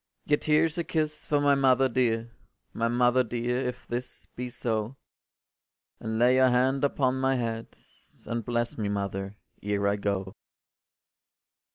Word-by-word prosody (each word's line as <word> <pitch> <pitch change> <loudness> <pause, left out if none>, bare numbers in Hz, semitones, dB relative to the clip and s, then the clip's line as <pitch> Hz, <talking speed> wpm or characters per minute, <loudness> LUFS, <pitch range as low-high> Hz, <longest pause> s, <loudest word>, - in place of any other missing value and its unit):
“Yet 150 0 +1
here’s 155 +2 +3
a - - 0
kiss 155 -2 -2
for 145 - +2
my 145 0 +4
mother 135 -1 +4
dear, 115 -2 0 0.4
My 115 - 0
mother 125 +1 +3
dear, 120 +1 -2
if 125 - -6
this 120 +1 -5
be 125 0 -4
so, 115 0 -2 1.0
And 110 0 -3
lay 125 +2 +4
your 130 0 +5
hand 130 +2 +2
upon 130 -2 +1
my 135 0 +2
head, 115 -2 -2 0.6
And 115 0 -3
bless 120 +1 -2
me, 105 -2 -1
mother, 100 0 -3 0.3
ere 100 0 0
I 100 +1 +1
go. 100 -2 -2
120 Hz, 150 wpm, -27 LUFS, 115-130 Hz, 1.0 s, your